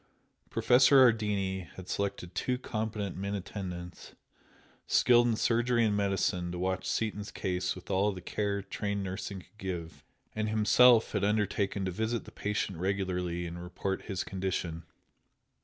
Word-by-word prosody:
Professor 130 +3 +5
Ardini 100 -5 0
had 95 -1 -9
selected 100 -3 -3
two 125 +5 -1
competent 110 -5 -3
men 100 +2 -3
attendants, 90 -3 -7 0.7
skilled 120 -1 +5
in 115 - +2
surgery 120 +1 +2
and 105 -2 +1
medicine 95 -3 0
to 90 - -5
watch 95 +1 -1
Seaton's 105 -2 -2
case 90 0 -2
with 90 - -9
all 100 +2 +2
the 95 - -7
care 100 +2 -2
trained 100 0 -3
nursing 95 0 -5
could 105 - -24
give, 90 -4 -5 0.3
and 110 0 -1
himself 110 +2 +5
had 105 - -1
undertaken 100 -1 0
to 95 - -1
visit 110 +5 -2
the - - -11
patient 100 -4 -2
regularly 90 -2 -1
and 85 +1 -6
report 95 +2 -3
his 95 -4 -2
condition. 90 -3 -3
100 Hz, 145 wpm, -30 LUFS, 90-110 Hz, 0.7 s, Professor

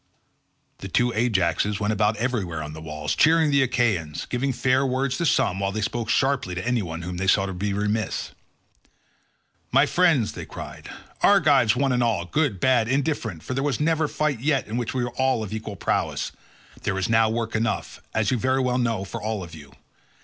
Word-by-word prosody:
The 95 - -6
two 120 +6 +1
Ajaxes 105 -3 +1
went 105 +1 0
about 105 +1 +2
everywhere 105 -10 -2
on 75 0 -7
the 80 - -9
walls 75 -1 -3
cheering 160 0 +4
on - - 0
the 140 -1 +4
Achaeans, 110 - 0
giving 130 +2 -1
fair 130 +1 +2
words 130 0 0
to 170 - 0
some 95 -8 +2
while 100 0 -1
they 110 +2 -3
spoke 115 +1 -3
sharply 130 -8 +1
to 90 +6 -4
any 125 -2 +1
one 85 -2 -5
whom 90 0 -5
they 95 +2 -2
saw 95 +1 +4
to 95 - -4
be 100 +3 -2
remiss. 105 +2 -2 1.4
"My 135 +3 +5
friends," 160 -9 +2
they - - -8
cried, - - -9 0.3
"Argives 145 - +5
one 135 +1 +1
and 125 -1 +1
all—good 115 - 0
bad 125 -2 +3
and 130 - +1
indifferent, 130 - -2
for - - -4
there 135 - -1
was 140 -3 -1
never 160 0 +1
fight 150 -4 -1
yet, 140 +2 +1
in 110 - -6
which 120 +1 -3
all 125 0 0
were - - -3
of 105 - -7
equal 110 -1 -5
prowess—there 95 +1 -4
is 95 - 0
now 110 -1 +3
work 115 0 -2
enough, 115 +1 -2
as 110 -2 +1
you 125 - +1
very 130 +3 +1
well 125 -1 +1
know, 115 -5 0
for 95 - -6
all 110 -2 -3
of 85 - -11
you. 75 -3 -12
115 Hz, 200 wpm, -24 LUFS, 100-130 Hz, 1.4 s, My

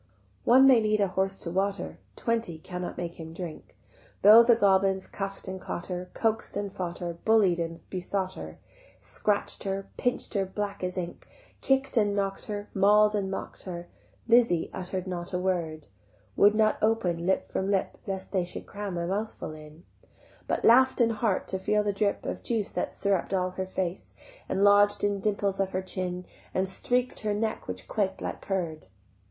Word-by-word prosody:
One 260 +3 +7
may 260 -4 +7
lead 215 0 +2
a 200 -2 +2
horse 190 +1 0
to 170 - -3
water, 195 +2 -2 0.2
Twenty 230 -8 -1
cannot 180 +2 -6
make 170 -1 -5
him 160 0 -8
drink. 170 -2 -8 0.5
Though 215 +3 +10
the 235 0 +6
goblins 195 -2 +3
cuff'd 195 -1 -6
and 190 0 -5
caught 175 - -5
her, 180 0 -5
Coax'd 225 -2 0
and 200 -1 -3
fought 175 -3 -4
her, 175 -1 -4
Bullied 205 -6 +4
and 165 0 -3
besought 185 0 -2
her, - - -8 0.4
Scratch'd 205 -1 -1
her, 195 0 -3
pinch'd 245 0 -1
her 200 -3 +1
black 200 0 -4
as 180 +1 -3
ink, 175 -1 -5 0.3
Kick'd 270 -1 +1
and 205 -2 +3
knock'd 195 -1 -2
her, 205 -1 -4
Maul'd 210 +2 +5
and 200 -2 -1
mock'd 195 - -6
her, 175 -2 -6 0.4
Lizzie 230 -8 +4
utter'd 185 0 -4
not 180 -1 -5
a - - +1
word; 170 -4 -2 0.5
Would 205 +1 +5
not 215 0 +2
open 185 -6 +1
lip 190 - +2
from 190 - -2
lip 195 -2 0
Lest 190 -1 -4
they 185 -3 +1
should 175 - -6
cram 200 -3 -5
a 170 - -1
mouthful 205 0 -3
in: 155 +1 -13 0.6
But - - 0
laugh'd 260 +4 +6
in 230 -1 +4
heart 215 -3 0
to 190 - -1
feel 210 +2 +1
the 205 -1 0
drip 200 0 0
Of - - -4
juice 225 -4 -1
that - - -3
syrupp'd 195 -1 0
all 185 -1 0
her 185 0 -4
face, 185 -1 -4 0.3
And 195 - +1
lodg'd 205 0 +5
in 205 -1 +1
dimples 200 -1 0
of 195 -1 0
her 185 +1 -1
chin, 180 -1 -3 0.3
And 190 +1 +1
streak'd 245 +6 -1
her 210 -1 -1
neck 220 +1 -2
which 90 0 -6
quaked 190 -3 -1
like - - -5
curd. 170 - -3
195 Hz, 185 wpm, -28 LUFS, 180-210 Hz, 0.6 s, Though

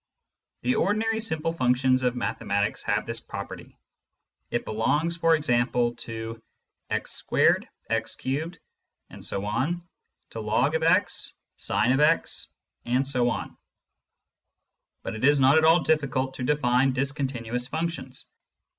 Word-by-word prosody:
The 125 +1 +2
ordinary 220 +6 +1
simple 165 -7 -2
functions 130 -2 +2
of 125 -1 +1
mathematics 100 -4 -1
have - - 0
this - - -4
property: - - -8 0.7
it - - -2
belongs, 150 +10 0
for 165 -1 +4
example, 120 -4 +1
to 115 0 -6 0.5
x - - -3
2, - - +5 0.3
x 115 0 -1
3,... 155 +6 -3 1.8
log 115 +9 +1
x, 165 - +2 0.2
sin 130 +4 +1
x, 150 - +2 0.4
and 130 +3 +1
so 125 -3 +2
on. - - -4 1.5
But - - -4
it 110 - -6
is 145 +1 +5
not 135 +4 +6
at 160 - +3
all 165 +2 +6
difficult 135 -4 +1
to - - -5
define 130 -1 +2
discontinuous 130 -3 -2
functions. 160 -3 -4
130 Hz, 115 wpm, -26 LUFS, 120-160 Hz, 1.8 s, not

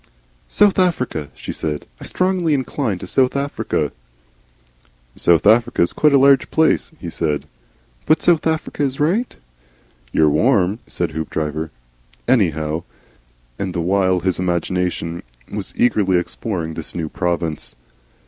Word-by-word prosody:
"South 200 - +3
Africa," 125 - 0
she - - -6
said. 75 -1 -3
"I - - -9
strongly 185 -4 +1
incline 130 -5 -2
to 95 - -8
South 130 +8 +2
Africa." 140 +1 -1 1.2
"South 85 +1 +3
Africa's 115 -4 +4
quite 150 - +3
a 140 - +6
large 135 0 +5
place," 160 +2 +2
he 85 - -7
said. 75 -3 -2 0.6
"But 155 - +3
South 170 -2 +3
Africa 160 -2 -2
is 135 -2 0
right?" 190 +12 +1 0.8
"You're 80 - +3
warm," 100 - +2
said 85 -2 -2
Hoopdriver, 80 0 -3 0.6
"anyhow," 80 - +1 0.8
and 95 -3 -3
the - - -1
while 95 0 +2
his 95 -1 0
imagination 90 -1 -1 0.3
was - - -5
eagerly 100 -6 +3
exploring 85 -2 -3
this 80 -1 -7
new 80 -2 -2
province. 85 -6 -3
95 Hz, 130 wpm, -20 LUFS, 85-135 Hz, 1.2 s, a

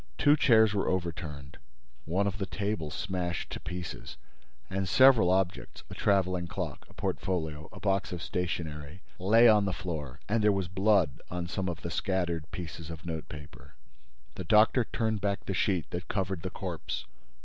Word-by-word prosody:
Two 145 +1 +5
chairs 110 -7 +5
were 100 - 0
overturned, 80 -6 -4 0.5
one 95 +5 +1
of 100 0 -2
the 95 - -2
tables 100 -7 -3
smashed 90 -3 -3
to - - -4
pieces 90 -1 -6 0.5
and 95 0 -2
several 130 -4 +7
objects—a 95 -1 -1
traveling 90 -3 +1
clock, - - -5
a - - -17
portfolio, 80 -4 -2
a - - -11
box 95 -1 0
of 90 - -4
stationery—lay 90 +6 +1
on 105 -2 +6
the 95 - 0
floor. 75 -8 -5
And 110 +1 +1
there 105 - +6
was 95 -3 -1
blood 95 -6 +2
on 90 -1 -3
some 95 +1 -2
of 85 - -5
the - - -4
scattered 85 -4 -1
pieces 80 -2 -7
of 80 +1 -8
note 80 -2 -5
paper. 75 -1 -11 0.6
The 95 - -6
doctor 110 +6 +5
turned 110 -3 -1
back 100 0 -1
the 95 - -2
sheet 90 -3 0
that 90 0 -4
covered 95 -3 -2
the 95 - -3
corpse. 90 -3 -5
90 Hz, 165 wpm, -30 LUFS, 85-100 Hz, 0.6 s, several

